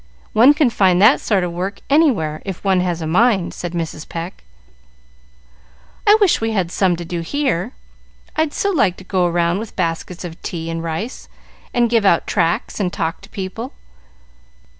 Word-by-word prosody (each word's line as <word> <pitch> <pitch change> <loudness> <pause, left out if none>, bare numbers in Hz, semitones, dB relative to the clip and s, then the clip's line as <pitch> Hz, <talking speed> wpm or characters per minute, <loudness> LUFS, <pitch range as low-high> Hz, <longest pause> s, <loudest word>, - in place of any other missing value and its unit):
One 255 +7 +6
can 295 -6 +3
find 185 -4 +3
that 215 +7 +6
sort 200 -4 +1
of 175 - -2
work 185 +4 -4
anywhere, 230 - +2
if 190 -3 -6
one 190 -2 +3
has 175 -2 -1
a - - -3
mind," 190 +2 +2
said 175 -1 -6
Mrs. 165 -2 -4
Pecq. 170 - -6 1.6
"I 415 +1 +8
wish 400 - +3
we 225 0 -1
had 185 -5 0
some 185 -2 +2
to 170 0 -7
do 175 0 -4
here. 265 - -1 0.6
I'd 315 -1 +1
so 400 +6 0
like 205 - +2
to - - -11
go 185 -2 +1
round 170 +1 +1
with 220 0 -8
baskets 170 0 -3
of 170 -2 -8
tea 165 -1 -4
and 165 0 -3
rice, 170 +10 -5 0.4
and 240 -1 +2
give 230 -2 +2
out 175 -4 +3
tracts 165 +5 0
and 185 -3 0
talk 165 0 -3
to - - -15
people. 205 +7 -6
185 Hz, 180 wpm, -19 LUFS, 170-225 Hz, 1.6 s, I